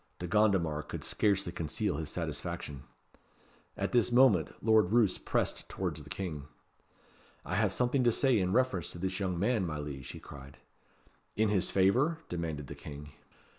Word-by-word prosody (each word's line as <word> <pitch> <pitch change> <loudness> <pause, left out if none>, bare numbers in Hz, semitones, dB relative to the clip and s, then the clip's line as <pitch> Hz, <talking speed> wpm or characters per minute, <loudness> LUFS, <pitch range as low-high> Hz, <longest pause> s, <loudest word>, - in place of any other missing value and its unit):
De 90 - -5
Gondomar 90 -6 +2
could 75 - -7
scarcely 100 -4 +1
conceal 85 +2 -2
his 80 -2 -4
satisfaction. 70 -3 -4 0.9
At - - -2
this 120 -1 +3
moment 120 - +5
Lord 110 -4 +3
Roos 115 -5 +3
pressed - - -1
towards - - -3
the - - -12
King. 75 -7 -4 1.0
"I 90 - -4
have 100 0 +2
something 125 +5 +1
to 120 - +5
say 130 -1 +3
in 90 -1 0
reference 110 - +1
to - - -8
this 95 +1 -2
young 95 -3 -1
man, 105 +3 +1
my 80 -4 -3
liege," 70 -3 -6
he - - -7
cried. 70 0 -12 0.8
"In 110 0 +2
his 95 -3 +2
favour?" 125 - +3
demanded 80 -4 -3
the - - -8
King. 75 0 -9
95 Hz, 165 wpm, -31 LUFS, 80-110 Hz, 1.0 s, moment